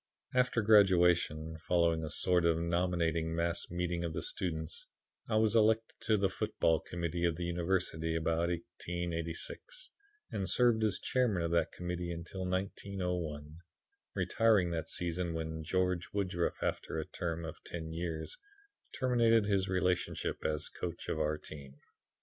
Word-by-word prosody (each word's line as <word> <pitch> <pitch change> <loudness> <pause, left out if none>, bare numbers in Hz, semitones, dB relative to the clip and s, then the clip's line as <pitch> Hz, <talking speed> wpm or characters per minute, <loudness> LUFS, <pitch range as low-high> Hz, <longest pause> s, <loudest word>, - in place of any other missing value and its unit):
After 125 -3 +2
graduation, 90 -6 +4
following 85 -1 +2
a 80 - -3
sort 90 +3 +2
of 85 -1 +3
nominating 85 -1 0
mass 85 +1 0
meeting 85 0 -1
of 85 -2 -2
the - - -3
students, 80 -3 -2 0.4
I 110 - +1
was 110 +1 +3
elected 110 0 +3
to 110 - +4
the 100 -1 +3
football 80 -3 +1
committee 85 0 -3
of 85 -1 +2
the 85 - -4
University, 85 -2 0
about 85 +1 +1
1886, 85 - -4 0.4
and 95 -2 0
served 120 +1 +4
as 105 -3 +2
chairman 115 -9 +1
of 85 - -1
that 85 -1 +2
committee 90 0 -4
until 85 +2 -5
1901; 90 -5 -3 0.6
retiring 105 -6 +3
that 80 -1 -3
season 85 -1 -1
when 80 0 -4
George 90 +1 0
Woodruff, 95 -4 -1
after - - -2
a 80 - -2
term 85 -1 -3
of 80 - -8
ten 80 -2 -6
years, 80 -2 -4 0.6
terminated 115 -4 +4
his 100 -2 +1
relationship 90 -1 0
as 75 -1 -1
coach 85 -1 -6
of 80 - -1
our 75 0 +1
team. 70 -4 -10
85 Hz, 145 wpm, -33 LUFS, 80-95 Hz, 0.6 s, graduation